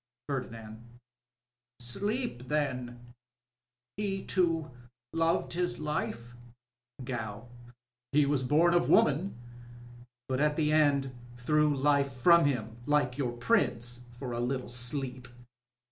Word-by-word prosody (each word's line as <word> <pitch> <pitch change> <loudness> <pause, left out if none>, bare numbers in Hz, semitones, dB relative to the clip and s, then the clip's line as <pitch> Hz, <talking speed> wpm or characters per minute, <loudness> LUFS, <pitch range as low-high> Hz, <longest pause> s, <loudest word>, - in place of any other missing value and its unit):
Pbrdinand.— 115 -5 -5 1.0
Sleep, 200 - -3
then.. 125 -5 -3 0.8
He 195 -2 -2
too, 165 -4 +1 0.4
loved 165 +1 +1
his 175 0 -1
life? 120 -6 -3 0.7
Gow. 115 -2 -5 0.3
— 120 0 -63
He 145 0 +4
Was 140 -1 +1
bom 155 +7 +3
of 175 - +2
woman... 155 +5 +3 0.9
but 130 -1 -1
at 150 0 +2
the 155 -1 +1
end 140 -4 +3 0.2
threw 150 +3 +2
Hfe 140 0 +2
from 170 +4 +6
him, 115 -5 -1
like 145 -3 +1
your 125 -4 -1
Prince, 120 - 0
for 120 +1 -7
a 120 - -3
little 125 +1 -2
sleep 125 +1 -2
135 Hz, 115 wpm, -30 LUFS, 120-150 Hz, 1.0 s, from